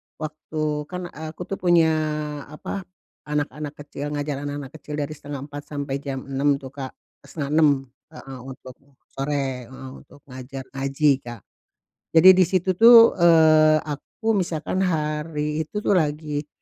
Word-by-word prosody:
waktu 155 Hz, -1 st, -4 dB
kan, 180 Hz, 0 st, -6 dB
eee, 160 Hz, +1 st, -8 dB
aku -, -, -6 dB
tuh 195 Hz, +2 st, -6 dB
punya, 170 Hz, -2 st, +4 dB, 0.6 s
apa, 175 Hz, +5 st, -7 dB, 0.4 s
anak-anak 150 Hz, 0 st, -3 dB
kecil 145 Hz, 0 st, -6 dB
ngajar 145 Hz, -1 st, -3 dB
anak-anak 145 Hz, -2 st, -6 dB
kecil 150 Hz, -, -7 dB
dari 145 Hz, 0 st, -3 dB
3.30 145 Hz, -1 st, -8 dB
sampai 140 Hz, -2 st, -4 dB
jam 135 Hz, -2 st, -5 dB
6.00 140 Hz, +1 st, +2 dB
tuh, 135 Hz, -1 st, -9 dB
Kak, 135 Hz, -2 st, -7 dB
eee, -, -, -26 dB
5.30 150 Hz, 0 st, +2 dB, 0.4 s
heeh, 135 Hz, -5 st, -10 dB
untuk 130 Hz, 0 st, -10 dB, 0.4 s
sore 135 Hz, -3 st, -3 dB
heeh, 130 Hz, +1 st, -10 dB
untuk 140 Hz, -, -19 dB
ngajar 130 Hz, +1 st, -8 dB
ngaji, 135 Hz, +2 st, +1 dB
Kak. 120 Hz, -6 st, -10 dB, 0.7 s
Jadi, 165 Hz, +3 st, +9 dB
di 185 Hz, 0 st, +5 dB
situ 185 Hz, +1 st, +1 dB
tuh, 230 Hz, +2 st, +7 dB
eee, 155 Hz, -2 st, +6 dB
aku 155 Hz, +10 st, -4 dB
misalkan 180 Hz, -3 st, -1 dB
hari 150 Hz, -3 st, -1 dB
itu 210 Hz, +4 st, -5 dB
tuh, -, -, +1 dB
lagi 150 Hz, -4 st, 0 dB
150 Hz, 145 wpm, -23 LUFS, 140-160 Hz, 0.7 s, Jadi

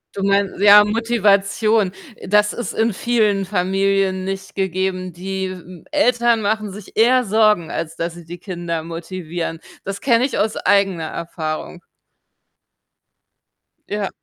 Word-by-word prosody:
Du 195 Hz, -, -3 dB
mein 200 Hz, -1 st, +2 dB
ja, 205 Hz, 0 st, +8 dB
Motivation. 210 Hz, -2 st, +2 dB, 0.2 s
Äh, -, -, -11 dB
das 210 Hz, +1 st, +3 dB
ist 240 Hz, -, -5 dB
in 225 Hz, 0 st, +1 dB
vielen 210 Hz, -2 st, +1 dB
Familien 195 Hz, 0 st, 0 dB
nicht 195 Hz, 0 st, -5 dB
gegeben. 185 Hz, -1 st, -2 dB
Die, 190 Hz, +1 st, -4 dB
hm, 180 Hz, -2 st, -11 dB
Eltern 240 Hz, -6 st, +2 dB
machen 210 Hz, 0 st, -1 dB
sich 200 Hz, 0 st, -11 dB
eher 250 Hz, +3 st, +4 dB
Sorgen, 210 Hz, -5 st, +3 dB
als 165 Hz, 0 st, -4 dB
dass 165 Hz, 0 st, -3 dB
sie 170 Hz, -1 st, -12 dB
die 175 Hz, +2 st, -8 dB
Kinder 175 Hz, -3 st, -4 dB
motivieren. 165 Hz, 0 st, -5 dB, 0.2 s
Das 195 Hz, 0 st, -5 dB
kenne 240 Hz, -1 st, +3 dB
ich 275 Hz, -, -3 dB
aus 215 Hz, +1 st, 0 dB
eigener 195 Hz, -5 st, +1 dB
Erfahrung. 160 Hz, +1 st, -5 dB, 2.1 s
Ja. 205 Hz, -1 st, -2 dB
195 Hz, 135 wpm, -20 LUFS, 180-215 Hz, 2.1 s, ja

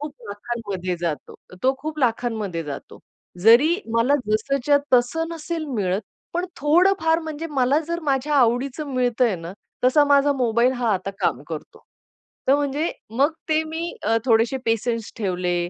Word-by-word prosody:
खूप 295 Hz, 0 st, -5 dB, 0.2 s
लाखांमध्ये 205 Hz, -4 st, -4 dB
जातो. 165 Hz, -4 st, -3 dB, 0.3 s
तो 265 Hz, +1 st, +3 dB
खूप 305 Hz, +2 st, -6 dB
लाखांमध्ये 225 Hz, -, -1 dB
जातो. 140 Hz, -2 st, -8 dB, 0.4 s
जरी 245 Hz, +10 st, +6 dB, 0.2 s
मला 235 Hz, +5 st, +3 dB
जसच्या 275 Hz, +6 st, +2 dB, 0.2 s
तसं 325 Hz, +7 st, +2 dB
नसेल 325 Hz, 0 st, -4 dB
मिळत, 190 Hz, -1 st, 0 dB, 0.3 s
पण 355 Hz, +1 st, -1 dB
थोडंफार 325 Hz, +2 st, +3 dB
म्हणजे 315 Hz, 0 st, -5 dB
मला 270 Hz, +1 st, +2 dB
जर 340 Hz, 0 st, -2 dB
माझ्या 280 Hz, +1 st, 0 dB
आवडीच 250 Hz, +3 st, +2 dB
मिळतय 250 Hz, -6 st, +1 dB
ना, 170 Hz, +1 st, -8 dB, 0.3 s
तसा 290 Hz, +3 st, +5 dB
माझा 285 Hz, 0 st, +4 dB
मोबाईल 240 Hz, +1 st, +2 dB
हा 240 Hz, -4 st, 0 dB
आता 190 Hz, +1 st, -3 dB
काम -, -, 0 dB
करतो. -, -, -8 dB, 0.7 s
तर 275 Hz, -, +6 dB
म्हणजे 290 Hz, +3 st, -1 dB, 0.2 s
मग 275 Hz, +7 st, +2 dB, 0.2 s
ते 315 Hz, 0 st, +2 dB
मी 325 Hz, +2 st, -4 dB
अ, 225 Hz, +2 st, +2 dB
थोडेसे 230 Hz, +2 st, +3 dB
पेशन्स 225 Hz, 0 st, -1 dB
ठेवले. 180 Hz, -4 st, -1 dB
255 Hz, 145 wpm, -23 LUFS, 225-300 Hz, 0.7 s, जरी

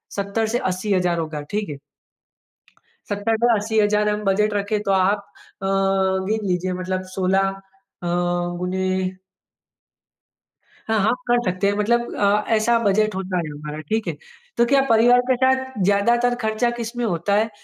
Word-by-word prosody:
70,000 200 Hz, +3 st, -1 dB
से 230 Hz, +2 st, 0 dB
80,000 185 Hz, -2 st, 0 dB
होगा। 155 Hz, -2 st, -4 dB
ठीक 210 Hz, -2 st, -2 dB
है? 145 Hz, -, -6 dB, 1.3 s
70 205 Hz, +2 st, 0 dB
टू 240 Hz, -, +4 dB
80 220 Hz, +1 st, 0 dB
हज़ार 210 Hz, 0 st, +2 dB
हम 210 Hz, 0 st, -2 dB
बजट 210 Hz, +2 st, +2 dB
रखें 205 Hz, +1 st, -1 dB
तो -, -, +3 dB
आप 190 Hz, +2 st, +3 dB, 0.4 s
अ, 195 Hz, -, 0 dB, 0.6 s
गिन 215 Hz, -1 st, -1 dB
लीजिए। 180 Hz, 0 st, -1 dB
मतलब 185 Hz, 0 st, -2 dB
16 190 Hz, +1 st, +2 dB
अ, 195 Hz, -, -8 dB, 0.4 s
गुने 175 Hz, +1 st, -1 dB, 2.0 s
हाँ, 220 Hz, -1 st, +1 dB
आप -, -, +2 dB
कर 240 Hz, 0 st, +4 dB
सकते 185 Hz, +2 st, -1 dB
हैं। 200 Hz, -, +2 dB
मतलब 235 Hz, +3 st, +1 dB
अ, 205 Hz, +1 st, +2 dB
ऐसा 230 Hz, +2 st, +3 dB
बजट 215 Hz, 0 st, +2 dB
होता 190 Hz, -1 st, -3 dB
है 170 Hz, -, 0 dB
हमारा, 150 Hz, +1 st, -7 dB
ठीक 220 Hz, 0 st, -1 dB
है। -, -, -2 dB, 0.4 s
तो 235 Hz, -, +4 dB
क्या 270 Hz, +2 st, +4 dB
परिवार 235 Hz, +2 st, +5 dB
के 260 Hz, -, +4 dB
साथ 260 Hz, 0 st, +2 dB, 0.2 s
ज़्यादातर 235 Hz, +5 st, +2 dB
खर्चा 220 Hz, +2 st, +1 dB
किसमें 235 Hz, +1 st, -3 dB
होता 175 Hz, 0 st, -1 dB
है, 220 Hz, +2 st, +2 dB
205 Hz, 155 wpm, -22 LUFS, 185-220 Hz, 2.0 s, परिवार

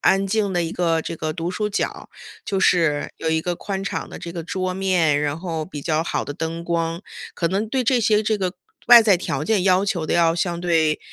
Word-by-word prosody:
安 195 Hz, +1 st, +3 dB
静 200 Hz, 0 st, 0 dB
的 175 Hz, -1 st, +1 dB
一 165 Hz, -, -3 dB
个 165 Hz, -2 st, 0 dB
这 165 Hz, -, -5 dB
个， 155 Hz, 0 st, -3 dB
读 170 Hz, +1 st, -3 dB
书 210 Hz, +3 st, -2 dB
角 205 Hz, -, 0 dB
儿。 -, -, -12 dB, 0.4 s
就 195 Hz, -, -1 dB
是 165 Hz, -6 st, +2 dB
有 160 Hz, -, -2 dB
一 160 Hz, 0 st, +1 dB
个 175 Hz, +2 st, -2 dB
宽 195 Hz, -1 st, -4 dB
敞 -, -, -4 dB
的 -, -, -9 dB
这 170 Hz, -, -7 dB
个 170 Hz, -1 st, -5 dB
桌 185 Hz, +1 st, -2 dB
面， 180 Hz, -6 st, +2 dB
然 145 Hz, +1 st, -1 dB
后 165 Hz, -3 st, -4 dB
比 150 Hz, -4 st, -8 dB
较 155 Hz, 0 st, 0 dB
好 170 Hz, -, -2 dB
的 -, -, -5 dB
灯 165 Hz, +2 st, -4 dB
光， 170 Hz, 0 st, -2 dB, 0.3 s
可 170 Hz, -, 0 dB
能 200 Hz, +4 st, -1 dB
对 260 Hz, +2 st, 0 dB
这 250 Hz, 0 st, +3 dB
些 215 Hz, -1 st, +3 dB
这 215 Hz, -1 st, 0 dB
个 185 Hz, -1 st, -2 dB, 0.3 s
外 240 Hz, -1 st, +10 dB
在 205 Hz, -4 st, +4 dB
条 145 Hz, -4 st, -3 dB
件 205 Hz, -1 st, +1 dB
要 185 Hz, +1 st, +4 dB
求 175 Hz, -7 st, -2 dB
得 -, -, 0 dB
要 165 Hz, -1 st, +3 dB
相 170 Hz, 0 st, -1 dB
对， 160 Hz, -3 st, +2 dB
175 Hz, 260 characters per minute, -22 LUFS, 165-195 Hz, 0.4 s, 外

